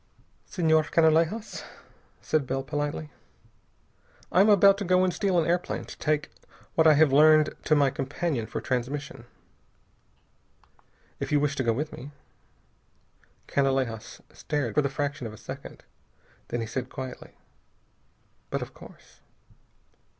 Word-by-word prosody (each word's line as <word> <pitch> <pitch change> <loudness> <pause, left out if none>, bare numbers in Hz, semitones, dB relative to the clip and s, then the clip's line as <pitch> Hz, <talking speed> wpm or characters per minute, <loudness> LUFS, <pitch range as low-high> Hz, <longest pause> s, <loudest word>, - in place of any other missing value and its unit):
"Senhor 160 -5 +2
Canalejas," 165 +6 +2 0.6
said 155 -4 0
Bell 135 +1 -2
politely, 145 +1 -3 1.2
"I 180 - +5
am 210 - +5
about 200 -1 +6
to - - -2
go 185 0 +3
and 185 -1 +1
steal 190 0 0
an 165 - +3
airplane 175 +1 -1
to - - -10
take 150 0 -1 0.4
what 160 0 +4
I 155 - +7
have 150 -2 +4
learned 155 +1 +6
to 155 - +4
my 140 -2 +3
companion 135 -2 -3
for - - -4
transmission. 130 +3 -4 1.9
If - - -4
you 145 - +4
wish 145 0 0
to 130 - 0
go 115 -2 +2
with 150 +6 -4
me...." 135 - -9 1.4
Canalejas 130 -5 -1
stared 145 -6 -3
for 150 - +3
the 140 - -1
fraction 145 -2 -3
of 110 - -9
a - - -11
second. 130 +4 -9 0.6
Then 120 - -3
he - - -2
said 125 +3 -4
quietly: 130 -1 -8 1.2
"But - - -2
of - - -11
course." - - -16
150 Hz, 140 wpm, -27 LUFS, 135-160 Hz, 1.9 s, I